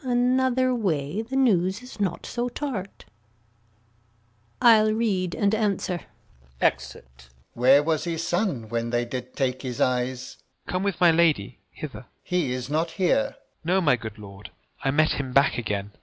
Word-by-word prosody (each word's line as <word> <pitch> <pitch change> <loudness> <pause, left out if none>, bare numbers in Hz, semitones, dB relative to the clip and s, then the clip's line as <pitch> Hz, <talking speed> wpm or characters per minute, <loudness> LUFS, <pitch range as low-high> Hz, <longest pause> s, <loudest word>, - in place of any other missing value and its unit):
Another 255 +1 +2
way 180 - -1
The 235 +4 -6
news 205 -5 +2
is 250 -3 -12
not 190 -4 -2
so 240 +1 -2
tart. 235 -9 -5 1.5
I'll 215 -2 +6
read, 195 -6 0
and 200 0 +1
answer. 200 -4 0 0.6
Exit. 60 0 -2
Alb. - - -30 0.2
Where 130 +4 +5
was 155 0 0
his 165 -1 -2
son 175 - -1
when 115 0 -2
they 120 0 0
did 125 +1 -6
take 130 -1 -1
his 125 -3 -5
eyes? 125 0 -1
Gent. - - -33 0.2
Come 185 - -1
with 200 -3 -2
my 175 -2 +6
lady 160 -11 +1
hither. - - -8
Alb. - - -15 0.2
He 175 -8 -1
is 125 -1 -3
not 160 +4 0
here. 270 +9 +3
Gent. - - -24 0.3
No, 180 +4 +2
my 150 -8 +3
good 110 -2 -8
lord; 100 -1 -11 0.3
I 135 - +1
met 155 +3 +3
him 130 -2 -4
back 140 -1 +3
again. 105 -3 -3
165 Hz, 170 wpm, -25 LUFS, 125-210 Hz, 1.5 s, I'll